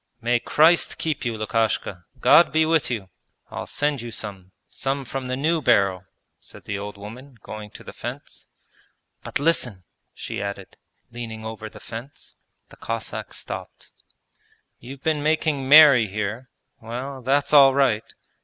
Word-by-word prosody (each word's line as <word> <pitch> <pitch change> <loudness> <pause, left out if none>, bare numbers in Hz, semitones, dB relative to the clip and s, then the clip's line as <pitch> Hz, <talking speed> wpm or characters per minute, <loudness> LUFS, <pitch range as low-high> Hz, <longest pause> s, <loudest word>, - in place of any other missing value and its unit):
'May 120 0 +1
Christ 160 +7 +3
keep 155 -4 -2
you, 115 -2 -2
Lukashka. 110 -5 -1
God 170 - +6
be 160 +2 +3
with 160 -1 +2
you! 105 -7 -4 0.4
I'll - - -6
send 145 -3 -1
you 120 - -6
some, 100 -4 -6 0.2
some 135 0 -3
from 130 +1 -5
the 130 - -1
new 160 +4 +1
barrel,' 95 -7 +2 0.3
said - - -14
the 100 - -4
old 105 0 -7
woman, 120 +6 -11
going 110 -1 -8
to - - -13
the - - -10
fence: - - -8 0.8
'But - - -1
listen,' 125 - 0 0.3
she - - -6
added, 100 -1 -6 0.4
leaning 115 -2 -7
over 110 -1 -6
the - - -13
fence. 120 +6 -10 0.4
The - - -16
Cossack 115 -1 -5
stopped. - - -8 0.9
'You've 135 +3 -11
been 155 -2 +1
making 150 -3 0
merry 145 -6 +8
here; 110 +5 -4 0.3
well, 130 +4 -6
that's 140 +4 +1
all 135 -2 +8
right. 125 -6 +1
120 Hz, 150 wpm, -23 LUFS, 110-140 Hz, 0.9 s, merry